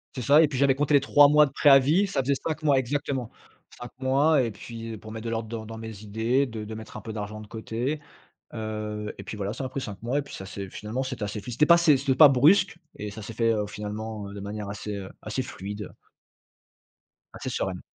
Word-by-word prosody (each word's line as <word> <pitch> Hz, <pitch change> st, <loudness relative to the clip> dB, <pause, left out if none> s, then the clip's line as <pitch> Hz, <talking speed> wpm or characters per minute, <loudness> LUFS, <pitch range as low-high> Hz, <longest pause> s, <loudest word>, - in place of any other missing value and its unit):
C'est 125 Hz, -, -4 dB
ça 145 Hz, +6 st, +6 dB
et 160 Hz, -, +5 dB
puis 135 Hz, -3 st, -4 dB
j'avais 140 Hz, 0 st, +4 dB
compté 145 Hz, +2 st, +2 dB
les -, -, +7 dB
3 145 Hz, +1 st, +6 dB
mois 150 Hz, +1 st, +6 dB
de 140 Hz, -, -7 dB
préavis 145 Hz, +7 st, +5 dB
ça 195 Hz, -9 st, 0 dB
faisait 140 Hz, +2 st, +1 dB
5 155 Hz, +2 st, -4 dB
mois, 140 Hz, -3 st, +4 dB
exactement. 130 Hz, -2 st, -2 dB, 0.5 s
5 120 Hz, -, -8 dB
mois 140 Hz, +3 st, +3 dB
et 120 Hz, -, 0 dB
puis, 115 Hz, +3 st, -8 dB
heu, -, -, -6 dB
pour 110 Hz, +1 st, -11 dB
mettre 110 Hz, +1 st, -7 dB
de -, -, -2 dB
l'ordre 115 Hz, -1 st, -2 dB
dans 110 Hz, -1 st, -5 dB
dans 115 Hz, -, -7 dB
mes 110 Hz, -2 st, -8 dB
idées 115 Hz, +6 st, 0 dB
de 110 Hz, -3 st, -6 dB
de 110 Hz, +1 st, -7 dB
mettre 110 Hz, 0 st, -9 dB
un -, -, -7 dB
peu 110 Hz, +2 st, -7 dB
d'argent 105 Hz, 0 st, -5 dB
de 105 Hz, -, -11 dB
côté. 115 Hz, +7 st, -3 dB, 0.5 s
Heu 105 Hz, -1 st, -4 dB
et -, -, -8 dB
puis -, -, -6 dB
voilà, 100 Hz, 0 st, -2 dB
ça 130 Hz, -, -5 dB
m'a 130 Hz, -, -4 dB
pris 135 Hz, -, -4 dB
5 105 Hz, -5 st, -7 dB
mois 125 Hz, +5 st, 0 dB
et -, -, 0 dB
puis 140 Hz, -, -11 dB
ça 95 Hz, -, -7 dB
s'est 100 Hz, 0 st, -7 dB
finalement 110 Hz, +7 st, -4 dB
c'était 130 Hz, -3 st, -5 dB
assez 105 Hz, +1 st, -3 dB
fi 120 Hz, +4 st, -7 dB
c'était 135 Hz, +6 st, +3 dB
pas 170 Hz, +1 st, +7 dB
c'est 160 Hz, -4 st, +5 dB
c'était 135 Hz, 0 st, 0 dB
pas 150 Hz, +3 st, +9 dB
brusque 165 Hz, +9 st, +4 dB, 0.2 s
et 105 Hz, 0 st, -5 dB
ça 110 Hz, +2 st, -9 dB
s'est 110 Hz, -, -7 dB
fait, 115 Hz, +1 st, +2 dB
heu, 105 Hz, -2 st, -1 dB
finalement, 105 Hz, 0 st, -6 dB
heu, 100 Hz, -, -9 dB
de 100 Hz, -, -7 dB
manière 100 Hz, +1 st, -5 dB
assez, 105 Hz, +1 st, -5 dB
heu, 95 Hz, -1 st, -6 dB
assez 110 Hz, +5 st, -2 dB
fluide 105 Hz, -3 st, -7 dB, 1.4 s
assez -, -, -5 dB
sereine. 90 Hz, -2 st, -2 dB
115 Hz, 250 wpm, -26 LUFS, 105-140 Hz, 1.4 s, pas